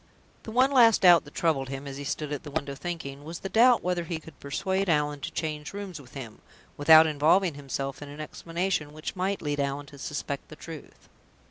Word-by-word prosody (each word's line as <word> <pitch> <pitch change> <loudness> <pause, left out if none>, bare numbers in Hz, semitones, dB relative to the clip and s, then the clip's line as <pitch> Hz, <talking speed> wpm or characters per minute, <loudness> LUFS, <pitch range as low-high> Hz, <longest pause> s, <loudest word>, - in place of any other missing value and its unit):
The 220 - -8
one 255 +4 +4
last 235 -5 +6
doubt 175 -4 +7
that 145 - -14
troubled 140 -6 +1
him, 135 +1 -6
as 140 -1 -6
he 145 - -6
stood 150 +1 -3
at 145 - -4
the - - -9
window 145 -1 -3
thinking, 145 -3 -6
was 165 +3 -7
the 195 - -4
doubt 240 +3 +5
whether 180 -1 0
he 165 -1 -3
could 160 -2 -15
persuade 190 +6 -1
Allan 150 -2 +1
to - - -4
change 155 0 -4
rooms 195 -6 -6
with 130 - -17
him, 120 -5 -8 0.3
without 160 +2 +8
involving 160 +4 +3
himself 135 -1 -5
in 145 - -8
an 145 +1 -10
explanation 165 0 -3
which 155 +4 -6
might 190 +1 -1
lead 145 -1 -2
Allan 140 +1 -2
to 140 0 -14
suspect 140 -1 -4
the 155 - -10
truth. 160 -1 -11
155 Hz, 215 wpm, -27 LUFS, 145-180 Hz, 0.3 s, without